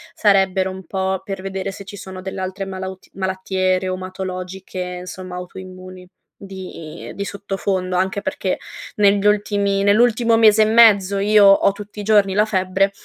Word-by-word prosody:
sarebbero 190 -2 +2
un 190 -1 -9
po' 190 -1 -2
per 195 -1 -6
vedere 195 0 -4
se 200 - -10
ci 205 - -9
sono 190 -1 -9
delle 190 0 -5
altre 190 +1 -4
malaut 190 0 -7
malattie 190 0 -1
reumatologiche, 185 0 -6 0.2
insomma, 185 0 -8
autoimmuni 185 0 -10 0.3
di 185 -5 -9
i - - -8
di 200 - -4
sottofondo. 195 -2 -3
Anche 190 +2 0
perché, 185 - -2 0.4
negli 200 -1 +3
ultimi 200 -1 +1
nell'ultimo 230 +2 +3
mese 220 -1 +6
e - - +3
mezzo 205 -3 +5
io 205 0 +5
ho 195 0 +6
tutti 205 +1 -10
i - - -4
giorni 205 -2 +3
la 210 +2 +3
febbre, 190 -1 +1
190 Hz, 155 wpm, -20 LUFS, 185-200 Hz, 0.4 s, mese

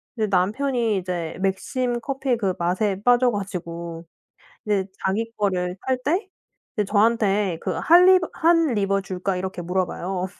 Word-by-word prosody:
근데 220 -3 0
남편이 215 +4 +1
이제 175 -3 -4
맥심 240 +6 -1
커피 265 0 -1
그 195 -4 0
맛에 190 +3 0
빠져 245 0 +4
가지고 170 -4 -5 0.6
이제 200 -2 +1 0.2
자기 225 +4 -1
거를 180 -3 -1
탈 260 -1 +1
때 365 +7 0 0.5
이제 210 - +1
저한테 205 -3 +2
그 - - -2
"할 350 +2 +5
리버 370 -2 +5 0.2
Han 330 -2 +4
river 195 -2 +1
줄까?" 185 0 -3
이렇게 185 -1 -4
물어 180 +1 0
봐요. 185 +1 -4
200 Hz, 305 characters per minute, -23 LUFS, 185-245 Hz, 0.6 s, 할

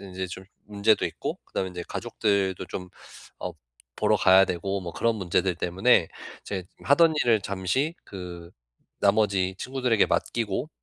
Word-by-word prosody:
인제 95 -1 -5
좀 95 +2 -8 0.2
문제도 105 +1 +2
있고 - - -5
그다음에 95 -1 -3
이제 90 -1 -6
가족들도 95 -3 -1
좀 90 -1 -6 0.5
어 - - -4 0.4
보러 - - +3
가야 95 +1 +6
되고 95 +2 -2
뭐 85 -2 -6
그런 115 -1 +1
문제들 95 -1 0
때문에 90 +1 +3 0.3
이제 95 -3 -4 0.2
하던 160 +3 +5
일을 115 -3 +4
잠시 100 - -1
그 90 -3 -9 0.5
나머지 100 -2 +2
친구들에게 125 -4 +1
맡기고 115 +3 -1
95 Hz, 305 characters per minute, -26 LUFS, 95-110 Hz, 0.5 s, 가야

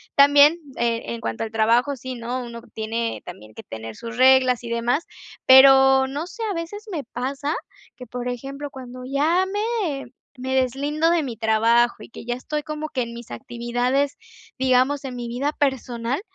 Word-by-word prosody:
también, 285 +3 +6 0.2
eh, 235 -1 0
en 115 0 -5
cuanto 115 0 -3
al 225 - -5
trabajo, 235 +5 +2
sí, 260 +1 -7
¿no?, 245 +2 -4
uno 235 -1 -8
tiene 225 +1 -3
también 110 -11 -11
que - - -9
tener 110 0 -8
sus 230 +1 -8
reglas 255 -1 +5
y 235 - -6
demás, 235 +6 0 0.4
pero 265 0 +8
no 290 +5 -4
sé, 450 +5 -7
a - - -2
veces 350 +6 -6
me 310 -6 -3
pasa 275 +5 -3 0.4
que, 250 - -10
por 245 +2 -5
ejemplo, 275 +4 -5
cuando 255 -2 -9
ya 315 +6 +2
me 410 - -2 0.3
me 260 +1 -3
deslindo 285 +5 +1
de 340 -3 +2
mi 245 -4 -5
trabajo 230 +2 +3
y - - -12
que - - -10
ya 240 +1 -2
estoy 300 +4 -4
como 305 0 -5
que 255 - -2
en 235 0 -4
mis 235 - -10
actividades, 245 - -1 0.4
digamos 260 +2 +2
en 260 -2 -6
mi 240 -1 -5
vida 255 +5 -1
personal 260 -1 -1
255 Hz, 180 wpm, -23 LUFS, 235-285 Hz, 0.4 s, pero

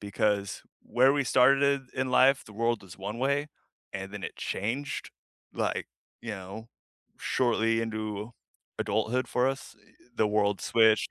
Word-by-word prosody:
because 100 0 -1 0.2
where 130 +4 +4
we 140 -1 +1
started 135 +2 +4
in 130 -1 -1
life, 135 +2 +5
the 105 - -13
world 115 +1 0
is 90 0 -13
one 105 +4 -5
way, 140 +3 +1 0.4
and 95 +1 -5
then 105 - -6
it - - -5
changed, 125 +8 -3 0.4
like, - - -1 0.3
you 120 - -5
know, 100 +3 -7 0.5
shortly 115 -2 +1
into 110 -1 -4 0.5
adulthood 115 +4 0
for 125 +1 +2
us, 135 -3 -5
eh, 105 - -25 0.2
the 110 - +3
world 105 -1 +1
switched. 110 -2 +4
115 Hz, 145 wpm, -29 LUFS, 105-130 Hz, 0.5 s, life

